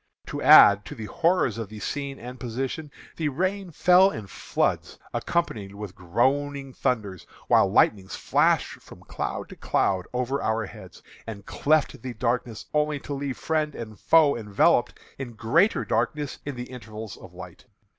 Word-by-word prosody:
To -, -, -4 dB
add 100 Hz, 0 st, +8 dB
to -, -, -8 dB
the 110 Hz, -, -7 dB
horrors 165 Hz, -, +1 dB
of 110 Hz, -4 st, -5 dB
the 110 Hz, 0 st, -9 dB
scene 140 Hz, +5 st, -4 dB
and 125 Hz, +1 st, -9 dB
position, 130 Hz, +6 st, -4 dB, 0.3 s
the 155 Hz, -3 st, 0 dB
rain 185 Hz, +6 st, -2 dB
fell 180 Hz, +4 st, +5 dB
in 110 Hz, -, -6 dB
floods, 95 Hz, -, -2 dB, 0.2 s
accompanied 105 Hz, -, -2 dB
with 100 Hz, -2 st, -7 dB
groaning 135 Hz, +8 st, -1 dB
thunders, 105 Hz, -9 st, -2 dB, 0.2 s
while 95 Hz, -, +4 dB
lightnings 95 Hz, -2 st, +2 dB
flashed -, -, +1 dB
from -, -, -14 dB
cloud -, -, -5 dB
to -, -, -10 dB
cloud 95 Hz, -2 st, 0 dB
over 125 Hz, +3 st, -1 dB
our 110 Hz, 0 st, 0 dB
heads, -, -, -13 dB, 0.2 s
and 100 Hz, -3 st, -7 dB
cleft 155 Hz, 0 st, +1 dB
the 125 Hz, -2 st, -6 dB
darkness 115 Hz, -1 st, -2 dB
only 150 Hz, -1 st, +1 dB
to 145 Hz, -, -6 dB
leave 140 Hz, -1 st, -4 dB
friend 155 Hz, -2 st, -1 dB
and 110 Hz, -3 st, -8 dB
foe 155 Hz, -3 st, +4 dB
enveloped 105 Hz, -4 st, +2 dB, 0.2 s
in 125 Hz, -3 st, -6 dB
greater 135 Hz, -, +2 dB
darkness 130 Hz, +5 st, -1 dB
in 145 Hz, -, -3 dB
the 125 Hz, +1 st, -7 dB
intervals 110 Hz, -3 st, -8 dB
of 90 Hz, -1 st, -14 dB
light. 90 Hz, -1 st, -11 dB
125 Hz, 160 wpm, -25 LUFS, 105-145 Hz, 0.3 s, add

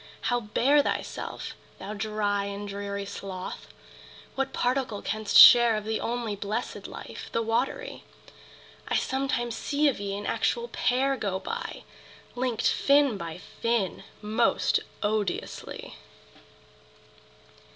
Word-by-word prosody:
How 245 Hz, -, +3 dB
bear 250 Hz, +6 st, +3 dB
thyself, -, -, -4 dB, 0.2 s
thou 200 Hz, +2 st, -6 dB
dry 205 Hz, -1 st, -1 dB
And 200 Hz, +1 st, -5 dB
dreary 200 Hz, 0 st, -4 dB
sloth? 190 Hz, -2 st, -7 dB, 0.7 s
What 270 Hz, 0 st, -1 dB
particle 245 Hz, -4 st, -1 dB
canst 215 Hz, -1 st, +1 dB
share 240 Hz, -2 st, +10 dB
Of 215 Hz, -1 st, -3 dB
the 220 Hz, 0 st, -1 dB
only 235 Hz, -3 st, -2 dB
blessed 210 Hz, +4 st, -4 dB
life, -, -, -9 dB
the 230 Hz, -, +1 dB
watery? 260 Hz, -, -2 dB, 0.8 s
I -, -, 0 dB
sometimes 265 Hz, -3 st, 0 dB
see 295 Hz, +1 st, +1 dB
of 275 Hz, -, +1 dB
ye 200 Hz, 0 st, -3 dB
an 205 Hz, -, -6 dB
actual 475 Hz, 0 st, 0 dB
pair 270 Hz, +2 st, +1 dB
Go 195 Hz, -4 st, -2 dB
by! 465 Hz, -, -5 dB, 0.5 s
linked 245 Hz, -2 st, 0 dB
fin 280 Hz, -4 st, +4 dB
by 170 Hz, -3 st, -6 dB, 0.2 s
fin! 230 Hz, -5 st, 0 dB, 0.2 s
most 220 Hz, +3 st, +2 dB, 0.2 s
odiously. 210 Hz, -3 st, -3 dB
220 Hz, 120 wpm, -27 LUFS, 205-255 Hz, 0.8 s, share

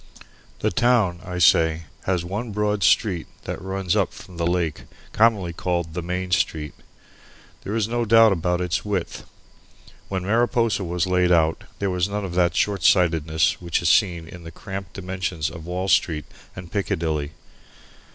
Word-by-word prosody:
The -, -, +1 dB
town, 105 Hz, -4 st, +2 dB
I 90 Hz, -1 st, -6 dB
say, 80 Hz, -1 st, +4 dB, 0.2 s
has 90 Hz, -2 st, 0 dB
one 105 Hz, +6 st, -4 dB
broad 105 Hz, 0 st, 0 dB
street 90 Hz, -3 st, +2 dB, 0.2 s
that -, -, -5 dB
runs 95 Hz, -1 st, -2 dB
up -, -, +1 dB
from 90 Hz, -2 st, -12 dB
the 85 Hz, 0 st, 0 dB
lake, 85 Hz, -4 st, -1 dB, 0.3 s
commonly 105 Hz, -6 st, +3 dB
called 85 Hz, -2 st, -2 dB
the 90 Hz, -, -3 dB
Main 90 Hz, +1 st, -4 dB
Street. 75 Hz, -4 st, 0 dB, 0.9 s
There 105 Hz, -, -4 dB
is 110 Hz, -2 st, +1 dB
no 120 Hz, +1 st, -1 dB
doubt 115 Hz, 0 st, +6 dB
about 90 Hz, -1 st, 0 dB
its 90 Hz, -2 st, -1 dB
width. 100 Hz, -4 st, -3 dB, 0.8 s
When 95 Hz, -2 st, -3 dB
Mariposa 115 Hz, -1 st, +1 dB
was 90 Hz, 0 st, -1 dB
laid 90 Hz, -1 st, +2 dB
out 80 Hz, -2 st, +2 dB
there 100 Hz, -1 st, -1 dB
was 90 Hz, +1 st, 0 dB
none 105 Hz, 0 st, -3 dB
of 90 Hz, -, -6 dB
that 90 Hz, -1 st, +2 dB
shortsightedness 80 Hz, -6 st, +2 dB
which 85 Hz, -1 st, 0 dB
is 85 Hz, -, +3 dB
seen 85 Hz, -4 st, +2 dB
in 90 Hz, 0 st, -11 dB
the 80 Hz, -, -8 dB
cramped 95 Hz, +2 st, -8 dB
dimensions 90 Hz, -4 st, -3 dB
of 80 Hz, -1 st, -10 dB
Wall 90 Hz, +2 st, -3 dB
Street 80 Hz, -4 st, +2 dB, 0.3 s
and 90 Hz, -2 st, -9 dB
Piccadilly. 80 Hz, -7 st, -2 dB
90 Hz, 160 wpm, -23 LUFS, 85-100 Hz, 0.9 s, doubt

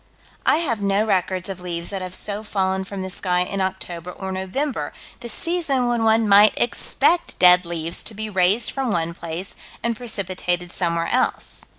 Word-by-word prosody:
I -, -, +5 dB
have 240 Hz, -11 st, -1 dB
no 200 Hz, +2 st, +2 dB
records 185 Hz, -3 st, 0 dB
of 190 Hz, -2 st, -6 dB
leaves 170 Hz, 0 st, -4 dB
that 195 Hz, -1 st, -3 dB
have 185 Hz, 0 st, -5 dB
so 205 Hz, 0 st, -2 dB
fallen 190 Hz, -3 st, -1 dB
from 195 Hz, -1 st, -5 dB
the 190 Hz, -, -4 dB
sky 180 Hz, -1 st, 0 dB
in 195 Hz, +2 st, -1 dB
October 180 Hz, -2 st, -4 dB
or 190 Hz, +1 st, -6 dB
November, 190 Hz, +10 st, -2 dB, 0.3 s
the 240 Hz, -, -7 dB
season 285 Hz, -3 st, +1 dB
when 240 Hz, -1 st, +1 dB
one 225 Hz, 0 st, +4 dB
might 205 Hz, +1 st, +6 dB
expect 335 Hz, +7 st, +1 dB
dead 180 Hz, -1 st, +6 dB
leaves 165 Hz, -1 st, -3 dB
to 215 Hz, -, -6 dB
be 220 Hz, +1 st, -4 dB
raised 200 Hz, +3 st, +2 dB
from 270 Hz, -2 st, -2 dB
one 170 Hz, -4 st, 0 dB
place 170 Hz, +3 st, -5 dB, 0.3 s
and 235 Hz, 0 st, 0 dB
precipitated 185 Hz, -6 st, -2 dB
somewhere 170 Hz, -2 st, 0 dB
else. 255 Hz, +1 st, -1 dB
190 Hz, 180 wpm, -22 LUFS, 180-220 Hz, 0.3 s, might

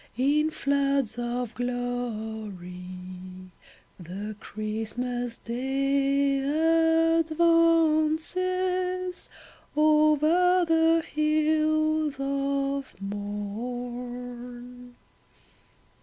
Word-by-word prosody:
in 295 Hz, +4 st, +2 dB
floods 275 Hz, -5 st, 0 dB
of 240 Hz, -1 st, -3 dB
glory 220 Hz, -6 st, -4 dB, 1.3 s
The 195 Hz, +5 st, -6 dB
Christmas 230 Hz, +3 st, -4 dB
Day 275 Hz, +3 st, +1 dB, 0.8 s
advances 335 Hz, +3 st, +1 dB, 0.5 s
over 310 Hz, +4 st, +4 dB
the 325 Hz, 0 st, +4 dB
hills 310 Hz, 0 st, +1 dB
of 275 Hz, -2 st, -2 dB
morn 245 Hz, +4 st, -6 dB
275 Hz, 50 wpm, -27 LUFS, 245-310 Hz, 1.3 s, over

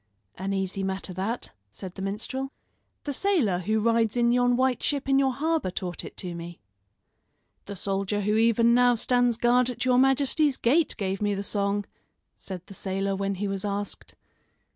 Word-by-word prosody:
"An 190 Hz, +2 st, -4 dB
easy 195 Hz, 0 st, -2 dB
matter 190 Hz, 0 st, -3 dB
that," 200 Hz, +7 st, -3 dB, 0.2 s
said 180 Hz, -, -9 dB
the 190 Hz, -, -8 dB
minstrel. 225 Hz, +7 st, -3 dB, 0.5 s
"The 285 Hz, -, -3 dB
sailor 275 Hz, -, +1 dB
who 215 Hz, +4 st, 0 dB
rides 230 Hz, 0 st, +2 dB
in 235 Hz, 0 st, +3 dB
yon 245 Hz, 0 st, +3 dB
white 260 Hz, -1 st, +1 dB
ship 285 Hz, -2 st, -1 dB
in 270 Hz, 0 st, +4 dB
your 270 Hz, -1 st, +3 dB
harbor 310 Hz, -, 0 dB
taught 180 Hz, -1 st, -4 dB
it -, -, -10 dB
to 180 Hz, -3 st, -4 dB
me." 170 Hz, 0 st, -8 dB, 1.1 s
"The 200 Hz, -, -6 dB
soldier 195 Hz, +2 st, -1 dB
who 210 Hz, +2 st, +1 dB
even 230 Hz, +1 st, +4 dB
now 245 Hz, 0 st, +5 dB
stands 245 Hz, 0 st, +2 dB
guard 240 Hz, +1 st, +3 dB
at 250 Hz, -, -3 dB
your 250 Hz, -1 st, +4 dB
majesty's 270 Hz, +2 st, +3 dB
gate 295 Hz, +7 st, +2 dB
gave 195 Hz, -2 st, -2 dB
me 205 Hz, -1 st, +1 dB
the 200 Hz, -, -3 dB
song," 200 Hz, 0 st, 0 dB, 0.5 s
said 185 Hz, -3 st, -8 dB
the -, -, -12 dB
sailor 195 Hz, +1 st, -2 dB
when 195 Hz, 0 st, -2 dB
he 200 Hz, +2 st, -2 dB
was 195 Hz, -1 st, -2 dB
asked. 205 Hz, 0 st, -4 dB
210 Hz, 180 wpm, -26 LUFS, 195-250 Hz, 1.1 s, now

